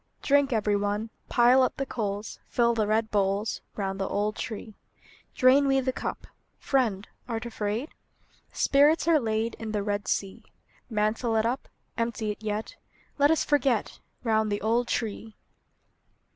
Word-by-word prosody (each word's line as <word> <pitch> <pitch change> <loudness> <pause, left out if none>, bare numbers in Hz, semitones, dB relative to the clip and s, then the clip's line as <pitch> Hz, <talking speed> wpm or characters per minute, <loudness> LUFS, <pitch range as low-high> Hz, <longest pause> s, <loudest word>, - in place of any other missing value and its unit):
Drink, 285 -1 +3
every 210 -3 +1
one; 205 +2 -1 0.2
Pile 245 +2 +5
up 255 - +1
the 275 - -1
coals; 210 -4 -4
Fill 235 -1 +2
the 220 -2 0
red 220 +1 +1
bowls, 200 +1 0
Round 195 -1 -3
the 195 - 0
old 210 +1 -1
tree! 220 0 -6 0.6
Drain 275 +2 +5
we 270 0 +3
the 260 0 -1
cup. - - -5 0.3
Friend, 225 -8 0 0.2
art 230 -1 -3
afraid? 220 +4 -3 0.6
Spirits 295 +4 +3
are 330 -2 +5
laid 225 -1 -1
In 220 -1 -5
the 205 -1 0
Red 205 -1 -2
Sea. 195 -1 -2 0.5
Mantle 220 +1 0
it 220 0 +2
up; 245 +3 -2 0.3
Empty 230 -2 -1
it 210 - -9
yet; 215 0 -4 0.4
Let 285 +1 +5
us 320 - +3
forget, 275 -6 +1 0.2
Round 220 -2 +1
the 205 - -1
old 230 +3 +1
tree! 220 -1 -3
225 Hz, 155 wpm, -27 LUFS, 210-255 Hz, 0.6 s, Pile